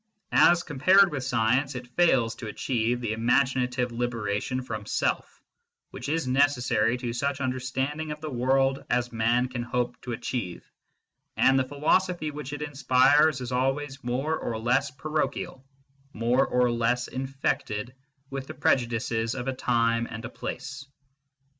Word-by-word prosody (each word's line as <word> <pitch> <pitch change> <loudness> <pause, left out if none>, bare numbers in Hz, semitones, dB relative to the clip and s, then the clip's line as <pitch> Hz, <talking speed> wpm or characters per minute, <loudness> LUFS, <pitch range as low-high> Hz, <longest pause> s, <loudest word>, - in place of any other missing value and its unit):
As 175 0 +5
compared 185 +6 +4
with 135 -3 -3
science, 125 +2 +1
it 125 0 -8
fails 130 -10 +3
to 110 - -7
achieve 120 +1 -1
the 110 -2 -1
imaginative 125 +1 +1
liberation 120 0 -2
from 110 -4 -6
self - - -2 0.5
which - - -6
is 160 -3 0
necessary 125 -4 +2
to 120 -2 -4
such 140 +3 -1
understanding 130 +4 -2
of 150 0 -5
the 155 -1 -6
world 135 +2 +1
as 125 0 0
man 120 +2 +2
can 125 -1 -4
hope 120 0 -2
to 125 - -5
achieve, 110 -6 -4 0.7
and 135 0 +5
the - - +2
philosophy 155 +3 +1
which 145 -1 -7
it 145 0 -4
inspires 145 0 +3
is 125 0 -5
always 135 +2 -1
more 130 +6 -1
or 115 -7 -3
less 125 +5 +1
parochial, 150 -1 -3 0.5
more 120 +4 +2
or 125 -1 +2
less 120 +1 0
infected 130 -4 -3 0.4
with 135 -1 -5
the - - -8
prejudices 115 -3 0
of 130 0 -5
a 135 - 0
time 115 -2 +1
and 115 0 -7
a - - -5
place. 135 +3 -6
130 Hz, 145 wpm, -27 LUFS, 120-140 Hz, 0.7 s, As